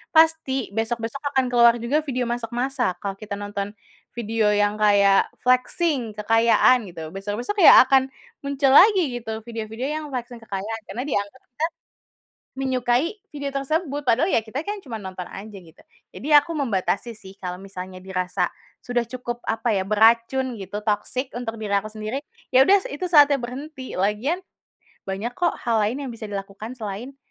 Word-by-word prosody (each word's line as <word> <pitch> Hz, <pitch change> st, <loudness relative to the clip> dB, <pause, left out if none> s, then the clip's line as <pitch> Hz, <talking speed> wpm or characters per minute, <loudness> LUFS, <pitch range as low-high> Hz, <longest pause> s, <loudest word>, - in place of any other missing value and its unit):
pasti 315 Hz, -6 st, +3 dB
besok 225 Hz, +1 st, -1 dB
besok 230 Hz, +5 st, -4 dB, 0.2 s
akan 265 Hz, -, +3 dB
keluar 235 Hz, -1 st, +6 dB
juga 270 Hz, +6 st, +1 dB
video 255 Hz, -3 st, -1 dB
masak 240 Hz, -1 st, -3 dB
masak 250 Hz, -6 st, 0 dB
kalau 200 Hz, -1 st, -3 dB
kita 210 Hz, -2 st, -5 dB
nonton, 205 Hz, 0 st, -4 dB, 0.4 s
video 225 Hz, -2 st, +1 dB
yang 205 Hz, 0 st, +2 dB
kayak 200 Hz, -2 st, +5 dB, 0.2 s
flexing 255 Hz, -, +1 dB
kekayaan 225 Hz, +2 st, +4 dB
gitu 160 Hz, -2 st, -8 dB
besok-besok 205 Hz, -, -4 dB
ya -, -, +11 dB
akan 265 Hz, 0 st, +3 dB, 0.3 s
muncul 280 Hz, -1 st, +1 dB
lagi 355 Hz, -, +6 dB
gitu 225 Hz, -1 st, -6 dB
video 225 Hz, -1 st, -6 dB
video 250 Hz, +5 st, -3 dB
yang 310 Hz, 0 st, -3 dB
flexing 245 Hz, -1 st, -5 dB
kekayaan 220 Hz, +2 st, -4 dB
karena 245 Hz, -, -5 dB
dianggap 205 Hz, -1 st, -2 dB
kan, -, -, -42 dB, 1.1 s
menyukai 260 Hz, -, +1 dB, 0.2 s
video 285 Hz, -1 st, -4 dB
tersebut 290 Hz, +1 st, -1 dB
padahal 245 Hz, +8 st, +3 dB
ya 230 Hz, -, +2 dB
kita 230 Hz, +5 st, -5 dB
kan 410 Hz, -1 st, -4 dB
cuma 235 Hz, -5 st, -6 dB
nonton 185 Hz, -2 st, -6 dB
aja 205 Hz, +1 st, -9 dB
gitu. 165 Hz, -1 st, -19 dB, 0.3 s
Jadi 275 Hz, -, -8 dB
aku 290 Hz, +3 st, +5 dB
membatasi 230 Hz, -2 st, -1 dB
sih 195 Hz, -2 st, -12 dB
kalau 180 Hz, -1 st, -4 dB
misalnya 185 Hz, -1 st, -8 dB
dirasa, 185 Hz, -1 st, -1 dB, 0.3 s
sudah 240 Hz, -1 st, -1 dB
cukup 240 Hz, 0 st, -5 dB
apa 225 Hz, +1 st, 0 dB
ya 190 Hz, -, +1 dB
beracun 230 Hz, +3 st, +3 dB
gitu 205 Hz, +2 st, -6 dB
toksik 225 Hz, +5 st, -1 dB
untuk 230 Hz, -2 st, -4 dB
diri 205 Hz, -1 st, -4 dB
aku 200 Hz, +2 st, -3 dB
sendiri, 215 Hz, +4 st, -4 dB, 0.3 s
ya 260 Hz, +1 st, +7 dB
udah 395 Hz, 0 st, +5 dB
itu 290 Hz, +6 st, -4 dB
saatnya 290 Hz, -4 st, +6 dB
berhenti 260 Hz, +3 st, -7 dB
lagian, 215 Hz, -, 0 dB, 0.7 s
banyak 200 Hz, +5 st, -3 dB
kok 345 Hz, +6 st, 0 dB
hal 230 Hz, -2 st, +2 dB
lain 245 Hz, +7 st, -1 dB
yang 260 Hz, -, -5 dB
bisa 220 Hz, -2 st, -8 dB
dilakukan 200 Hz, +4 st, -6 dB
selain, 225 Hz, +4 st, -6 dB
235 Hz, 165 wpm, -23 LUFS, 205-265 Hz, 1.1 s, ya